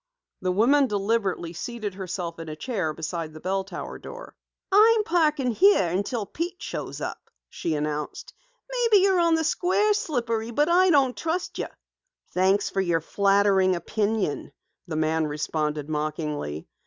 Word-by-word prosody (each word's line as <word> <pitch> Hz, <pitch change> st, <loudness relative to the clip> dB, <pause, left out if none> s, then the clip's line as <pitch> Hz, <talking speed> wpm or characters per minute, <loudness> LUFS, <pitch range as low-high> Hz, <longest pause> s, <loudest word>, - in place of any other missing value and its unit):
The 185 Hz, -1 st, 0 dB
woman 265 Hz, +9 st, +4 dB
deliberately 200 Hz, -5 st, -1 dB
seated 215 Hz, +2 st, -5 dB
herself 180 Hz, -3 st, -5 dB
in 165 Hz, -1 st, -7 dB
a 155 Hz, -, -5 dB
chair 190 Hz, -4 st, -2 dB
beside 160 Hz, 0 st, -5 dB
the -, -, -8 dB
bell 190 Hz, +3 st, -1 dB
tower 195 Hz, -, -7 dB
door. -, -, -10 dB, 0.4 s
"I'm 435 Hz, +2 st, +6 dB
parking 305 Hz, -8 st, +2 dB
here 370 Hz, -, +5 dB
until 200 Hz, +5 st, -2 dB
Pete 345 Hz, -, -5 dB
shows -, -, -5 dB
up," -, -, -6 dB, 0.2 s
she 165 Hz, -2 st, -3 dB
announced. 150 Hz, 0 st, -4 dB, 0.3 s
"Maybe 470 Hz, -5 st, +3 dB
you're 385 Hz, -2 st, +4 dB
on 335 Hz, -1 st, +4 dB
the 320 Hz, -, 0 dB
square, 370 Hz, +6 st, +2 dB
Slippery, 235 Hz, -, -2 dB
but 295 Hz, +7 st, +1 dB
I 365 Hz, +2 st, +5 dB
don't 275 Hz, -6 st, +3 dB
trust 335 Hz, +3 st, -3 dB
you." -, -, -2 dB, 0.6 s
"Thanks 190 Hz, +2 st, +2 dB
for 195 Hz, -, 0 dB
your 170 Hz, -3 st, +1 dB
flattering 195 Hz, +1 st, +3 dB
opinion," 205 Hz, -3 st, -1 dB, 0.4 s
the 165 Hz, -, -4 dB
man 155 Hz, 0 st, +1 dB
responded 150 Hz, 0 st, -2 dB
mockingly. 150 Hz, -, -3 dB
200 Hz, 150 wpm, -25 LUFS, -, 0.6 s, I'm